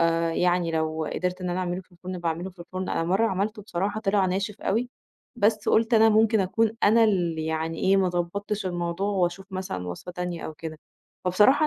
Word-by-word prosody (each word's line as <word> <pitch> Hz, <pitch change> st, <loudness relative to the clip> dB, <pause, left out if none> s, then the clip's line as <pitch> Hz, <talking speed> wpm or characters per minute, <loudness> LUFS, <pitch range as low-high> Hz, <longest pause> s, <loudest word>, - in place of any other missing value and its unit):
آآ، 165 Hz, 0 st, +2 dB
يعني 175 Hz, -1 st, +2 dB
لو 160 Hz, 0 st, -1 dB
قدِرت 180 Hz, 0 st, -2 dB
إن 180 Hz, -, -2 dB
أنا 175 Hz, -, -1 dB
أعمله 180 Hz, 0 st, -2 dB
في 185 Hz, -, -22 dB
الفرن 180 Hz, +1 st, -7 dB
باعمله 170 Hz, +2 st, -2 dB
في 180 Hz, -, -26 dB
الفرن، 185 Hz, +2 st, -5 dB
أنا 165 Hz, -, 0 dB
مرّة 195 Hz, +6 st, +2 dB
عملته 210 Hz, +2 st, -2 dB
بصراحة 200 Hz, +2 st, -2 dB
طلع 195 Hz, -2 st, +2 dB
ناشف 195 Hz, +3 st, -2 dB
أوي، 235 Hz, +5 st, 0 dB, 0.5 s
بس 210 Hz, -1 st, +2 dB
قُلت 225 Hz, +1 st, +3 dB
أنا 225 Hz, 0 st, +7 dB
ممكن 220 Hz, 0 st, +4 dB
أكون 215 Hz, +4 st, +2 dB
أنا 225 Hz, +2 st, +6 dB
الـ– 175 Hz, -6 st, +1 dB
يعني 160 Hz, +1 st, -2 dB
إيه 195 Hz, +1 st, +3 dB
ما 190 Hz, -1 st, +3 dB
ضبّطتش 195 Hz, +4 st, -2 dB
الموضوع 175 Hz, +2 st, -2 dB
وأشوف 190 Hz, -1 st, 0 dB
مثلًا 140 Hz, -, -4 dB
وصفة 130 Hz, -, -7 dB
تانية 180 Hz, -1 st, -4 dB
أو 155 Hz, -, -7 dB
كده، 155 Hz, 0 st, -7 dB, 0.5 s
فبصراحة 210 Hz, -, +5 dB
185 Hz, 195 wpm, -26 LUFS, 170-205 Hz, 0.5 s, أنا